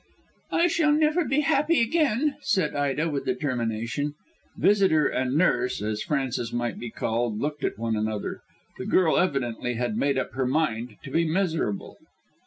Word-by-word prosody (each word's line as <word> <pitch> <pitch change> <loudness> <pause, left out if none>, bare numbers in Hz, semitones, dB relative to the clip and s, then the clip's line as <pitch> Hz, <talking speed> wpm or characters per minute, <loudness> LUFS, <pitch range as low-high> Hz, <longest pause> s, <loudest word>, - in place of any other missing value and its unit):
"I 335 - +3
shall 325 -3 +3
never 310 +3 +3
be 295 0 +1
happy 300 +3 +2
again," 290 +1 +2
said 185 - 0
Ida 145 +2 0
with 145 -3 -3
determination. 125 +1 -2 0.4
Visitor 195 -7 +4
and 130 +1 0
nurse 160 -7 +2
as 105 +1 -2
Frances 135 -7 -2
might 120 -1 -2
be 120 - -5
called 115 0 -1
looked 150 0 -3
at - - -1
one 115 0 -1
another. 110 -1 -3 0.4
The - - -5
girl 170 -4 +3
evidently 125 -8 -1
had 120 -2 -1
made 140 +2 +1
up 130 - -2
her 130 -1 -1
mind 125 -6 -1
to 135 - -8
be 165 +4 +2
miserable. 160 - -1
145 Hz, 160 wpm, -26 LUFS, 120-185 Hz, 0.4 s, Visitor